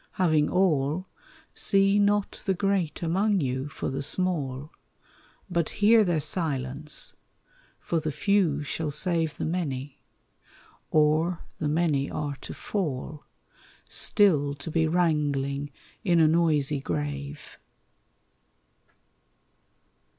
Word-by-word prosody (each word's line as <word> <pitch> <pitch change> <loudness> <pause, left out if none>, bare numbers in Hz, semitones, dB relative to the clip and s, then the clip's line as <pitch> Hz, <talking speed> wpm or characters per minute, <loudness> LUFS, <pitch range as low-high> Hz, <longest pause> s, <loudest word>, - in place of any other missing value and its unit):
Having 155 -5 +2
all, 170 -2 +1 0.5
See 195 +1 +3
not 205 0 +1
the 190 - +2
great 190 -4 -1
among 195 +5 +2
you 130 -1 -2
for - - -4
the 135 +1 -3
small, 145 -4 -2 0.8
But 170 -4 0
hear 220 +2 +6
their 175 -5 +1
silence; 150 -2 -2 0.6
for 170 - -1
the 155 0 -3
few 155 -1 +1
shall 155 +2 -3
save 165 +1 -1
The - - -2
many, 145 -5 -3 0.9
or 155 +3 +2 0.2
the 150 - -1
many 150 -3 +1
are 145 -2 -3
to - - -8
fall 155 -6 -4 0.6
Still 150 -9 +3
to 150 +3 -7
be 160 0 +2
wrangling 145 -4 0 0.3
in 175 -5 +3
a 160 - +6
noisy 155 -3 +2
grave. 145 0 -5
155 Hz, 105 wpm, -27 LUFS, 145-180 Hz, 0.9 s, hear